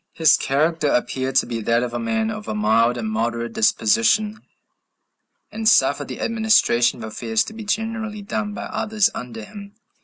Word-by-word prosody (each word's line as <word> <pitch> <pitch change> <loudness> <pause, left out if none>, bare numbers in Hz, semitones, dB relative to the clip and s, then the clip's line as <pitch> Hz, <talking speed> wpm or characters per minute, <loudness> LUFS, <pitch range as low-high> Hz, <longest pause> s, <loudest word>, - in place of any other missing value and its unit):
His 160 -2 +5
character 155 +3 0
appeared 130 0 -1
to - - +4
be 115 -1 -4
that 115 +2 +1
of 120 -1 -4
a - - -2
man 225 -1 -1
of 215 -1 -7
a - - -3
mild 115 +3 +2
and 115 -2 -3
moderate 115 +1 -2
disposition, 115 - +2 1.1
and 220 +1 +1
suffered 145 - +3
the - - -7
administration 220 - +2
of 110 - -5
affairs 110 0 0
to - - -9
be 220 0 -8
generally 220 -1 -3
done 205 +1 -3
by - - -5
others 220 0 0
under 115 -3 -7
him. 200 - -12
145 Hz, 175 wpm, -21 LUFS, -, 1.1 s, His